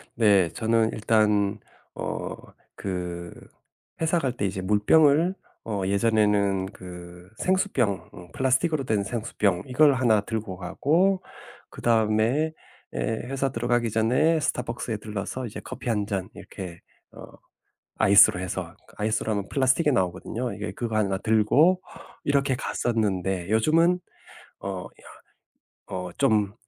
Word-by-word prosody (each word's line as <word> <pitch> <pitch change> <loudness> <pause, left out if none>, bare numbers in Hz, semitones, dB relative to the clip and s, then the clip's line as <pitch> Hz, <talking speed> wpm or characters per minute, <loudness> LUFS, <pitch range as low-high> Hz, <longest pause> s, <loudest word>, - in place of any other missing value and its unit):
네. 100 -6 +4
저는 110 +5 +1
일단 105 -2 +2 0.4
어 - - -4 0.4
그 90 -2 -4 0.7
회사 165 +2 +2
갈 130 -6 -1
때 100 - -1
이제 95 0 -2
물병을 145 - +4 0.3
어 105 -3 -2
예전에는 100 -2 +2
그 90 -1 -11
생수병 160 - 0
응 90 -3 -12
플라스틱으로 135 +3 +1
된 110 -5 0
생수병 105 -5 -1
이걸 140 +3 +4
1 115 -5 +3
들고 105 -4 -4
가고 165 - +1 0.5
그 - - -10
다음에 115 +7 +2 0.4
예 - - -4
회사 135 +4 -2
들어가기 120 0 0
전에 125 +10 +2
스타벅스에 120 -5 -2
들러서 105 +4 -5
이제 105 - -7
커피 - - -6
1 105 -3 0
잔 100 -1 -3
이렇게 90 -3 -9 0.3
어 - - -11 0.7
아이스로 100 -2 +6
해서 90 0 -5 0.2
아이스로 110 +1 0
하면 100 -2 -3
플라스틱이 135 +2 +2
나오거든요 95 +5 -2
이게. 105 0 -5
그거 115 -2 -3
1 100 -3 +1
들고 110 - +3 0.4
이렇게 140 -1 +2
갔었는데 95 -8 -1
요즘은 165 +11 +3 0.6
어 95 -2 -5 0.8
이런 90 - -8
어 - - -10
좀 105 -7 +2
110 Hz, 260 characters per minute, -25 LUFS, 100-130 Hz, 0.8 s, 아이스로